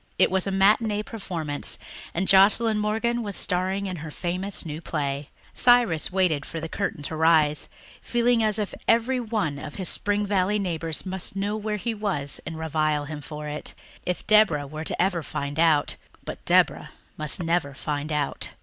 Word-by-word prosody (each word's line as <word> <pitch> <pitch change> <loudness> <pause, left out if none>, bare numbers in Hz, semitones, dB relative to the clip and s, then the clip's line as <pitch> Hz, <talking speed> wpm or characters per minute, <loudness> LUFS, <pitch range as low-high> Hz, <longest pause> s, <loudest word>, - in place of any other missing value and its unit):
It - - +4
was 190 0 +1
a - - 0
matinee 210 +2 +3
performance, 165 -10 -3 0.4
and 190 +3 0
Joscelyn 210 +3 +5
Morgan 225 +3 0
was 205 -3 -4
starring 190 +2 0
in 185 -2 -4
her 160 0 -7
famous 180 +5 -2
new 155 0 -5
play. 140 -2 -3 0.2
Cyrus 240 -12 +4
waited 180 -6 +2
for 165 - -6
the 165 - -4
curtain 170 -4 -3
to 160 - -4
rise, 155 -2 +3 0.3
feeling 240 -1 +2
as 215 -1 +3
if 210 -2 -2
every 235 +3 +3
one 215 - -2
of 145 0 -8
his 190 -3 0
Spring 205 0 0
Valley 200 0 +1
neighbours 165 -5 -2
must 190 0 -4
know 200 +2 -1
where 215 0 -2
he 230 +3 -2
was 190 -10 -2
and 160 0 -5
revile 155 -2 0
him 150 0 -6
for 150 +1 -7
it. 150 0 -5 0.3
If 180 - -3
Deborah 210 -9 +4
were 155 +3 -6
ever 180 -2 +1
to - - -10
find 145 +2 -3
out... 160 -3 +3 0.3
but - - -7
Deborah - - +3 0.3
must 155 +2 -2
never 165 -4 0
find 150 +1 -3
out! 150 -2 -1
180 Hz, 175 wpm, -25 LUFS, 155-210 Hz, 0.4 s, Joscelyn